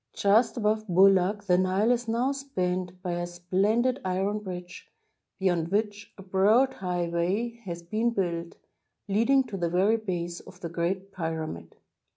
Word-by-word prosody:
Just 220 +5 +3
above 215 -1 0
Boulak 195 +2 +4
the 180 -3 +3
Nile 190 +5 +2
is 245 -1 0
now 235 +4 +1
spanned 185 -10 -3
by 180 - -2
a 175 0 -2
splendid 200 +9 0
iron 190 +3 -1
bridge, 180 -3 -8 0.5
beyond 175 -4 +1
which 205 +1 -2
a 195 - -10
broad 210 +8 +3
highway 180 +6 -2
has 170 -2 -6
been 220 +7 0
built, 170 -6 -2 0.5
leading 230 +7 +3
to 225 -6 -6
the 170 -2 -1
very 195 +6 +3
base 175 -5 -4
of 180 - -15
the 170 - -5
Great 185 +4 -2
Pyra 160 -3 -3
mid. 85 - -9
190 Hz, 155 wpm, -27 LUFS, 175-215 Hz, 0.5 s, Boulak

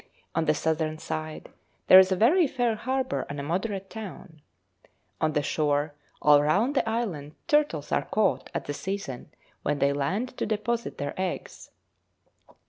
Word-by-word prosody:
On 165 0 +1
the 155 0 +3
southern 160 0 -1
side 155 0 -5 0.4
there 185 - +10
is 190 0 +5
a - - +3
very 300 - +4
fair 245 -3 0
harbour 260 +4 -1
and 145 0 -5
a - - -3
moderate 190 +5 -2
town. 190 -7 -9 0.8
On 155 -1 +2
the 150 - +1
shore 145 0 0 0.3
all 145 -1 +7
round 200 - +2
the 230 - +1
island 175 -11 -3
turtles 295 - +1
are - - +1
caught 200 -12 0
at - - -4
the 145 - -3
season 190 -7 -5 0.3
when 145 0 0
they 140 0 +2
land 190 - -2
to - - -1
deposit 225 +2 -2
their 145 - -3
eggs. 185 -1 -4
180 Hz, 160 wpm, -27 LUFS, 150-225 Hz, 0.8 s, there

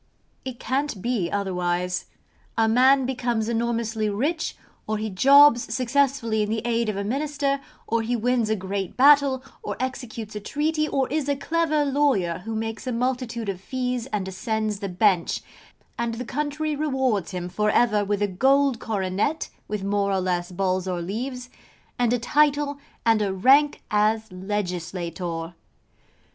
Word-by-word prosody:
It 260 -2 -6
can't 270 -4 -1
be 235 -8 0
otherwise. 180 -2 -1 0.5
A 225 -1 +4
man 260 +4 +5
becomes 240 -4 -1
enormously 230 -2 -1
rich, 290 +11 -1 0.3
or 215 0 0
he 215 0 -3
jobs 275 +3 +6
successfully 255 -2 +1
in 210 - -1
the 220 0 -1
aid 235 -1 +1
of 205 - -2
a 200 - -2
Minister, 280 +4 -1 0.2
or 230 0 0
he 235 +2 -1
wins 240 -1 +1
a 220 - +2
great 195 -1 -4
battle, 280 -1 +5 0.2
or - - -5
executes 245 -4 -5
a - - -2
treaty, 305 +7 -1
or 270 -3 0
is 290 -1 -1
a 285 - +2
clever 310 +1 +1
lawyer 270 - +1
who 225 0 -3
makes 225 +3 -4
a - - 0
multitude 240 -2 -2
of 190 -2 -3
fees 250 +1 -3
and 205 -6 -3
ascends 215 +2 -2
the 200 - -4
bench; 180 -1 +1 0.6
and 235 -1 -1
the 250 +2 -5
country 300 +3 -2
rewards 265 - 0
him 180 -2 -4
for 210 +4 0
ever 210 -2 +3
with 205 0 0
a - - +2
gold 265 +6 +2
coronet 205 +8 -1 0.2
(with 210 -2 -3
more 200 0 0
or 190 - +1
less 180 -1 -1
balls 185 0 -1
or 180 -1 -2
leaves) 250 +8 -4 0.5
and 240 -2 +2
a 245 - +3
title, 290 +3 +2 0.3
and 225 -2 +4
a 200 -2 0
rank 270 +10 +4
as 215 0 +1
legislator. 180 -3 -4
225 Hz, 160 wpm, -24 LUFS, 200-265 Hz, 0.6 s, jobs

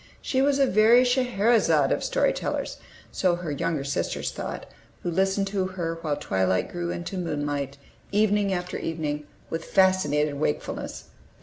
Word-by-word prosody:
She 260 - 0
was 280 0 +3
a 275 - +4
very 230 +2 +6
Scheherezade 230 - +3
of - - 0
story - - +2
tellers, - - -3 0.3
so 180 -2 +2
her 175 -3 -5
younger 145 +1 -1
sisters 140 0 -2
thought, - - -5 0.4
who 175 - -1
listened 195 +3 +1
to 195 -1 0
her 170 -3 -4
while 150 -3 -1
twilight 95 -8 0
grew 175 -1 -3
into 175 +2 -4
moonlight, 145 -4 -2 0.3
evening 205 -1 +2
after 180 -1 -3
evening, 150 -2 -3 0.2
with 165 0 -2
fascinated 150 -7 +2
wakefulness. 150 -1 -3
175 Hz, 145 wpm, -26 LUFS, 150-200 Hz, 0.4 s, very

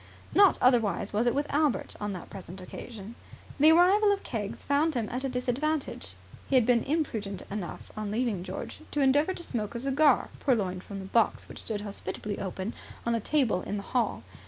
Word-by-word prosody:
Not 400 -2 +6
otherwise 230 -5 +3
was 225 +4 +2
it 240 - +2
with 285 +1 +1
Albert 295 -2 +1
on 205 0 -2
that 180 - -8
present 190 -1 -8
occasion. 205 +3 -8 0.5
The 305 +3 +8
arrival 385 +5 +6
of 400 0 -1
Keggs 210 -4 -4
found 295 +2 +2
him 230 -3 0
at 250 +2 -3
a 270 - 0
disadvantage. 250 - -2 0.3
He 275 - +2
had 250 -3 +5
been 240 -1 +4
imprudent 225 - -2
enough, 200 -4 -6
on 215 -1 -3
leaving 220 -3 0
George, - - -6
to 295 - -1
endeavour 290 +7 +3
to 345 - -4
smoke 225 -7 -3
a - - -2
cigar, 275 +1 +3
purloined 190 -9 0
from 200 - -7
the 190 - -6
box 225 +3 +1
which - - -7
stood 210 -2 -3
hospitably 205 0 -5
open 190 +2 -4 0.3
on 235 - +1
a 230 - +1
table 235 -6 +1
in 205 - -3
the 200 - -5
hall. 245 -2 +1
235 Hz, 195 wpm, -29 LUFS, 205-285 Hz, 0.5 s, The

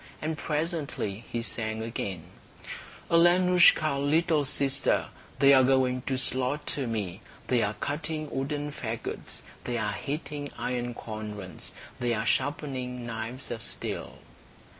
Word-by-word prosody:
And 155 +1 -2
presently 150 - -2
he 115 -1 -1
sang 110 -2 -2
again: 100 -6 -3 0.9
"Alenoushka, 175 -3 +6
little 155 +1 +3
sister, 135 0 +1 0.3
They 140 0 +7
are 130 -1 +7
going 130 -1 +3
to 130 - +1
slaughter 130 +1 +1
me; 105 -4 -3 0.3
They 125 -2 +4
are 105 0 0
cutting 155 +1 -3
wooden 145 +2 -2
fagots, 115 -5 -5 0.2
They 120 -1 -1
are 105 -2 0
heating 145 0 -4
iron 120 -1 -2
cauldrons, 105 -4 -7 0.3
They 120 -1 +1
are 110 0 -2
sharpening 130 -3 -1
knives 115 +3 -5
of 115 - -4
steel." - - -5
130 Hz, 120 wpm, -28 LUFS, 115-150 Hz, 0.9 s, They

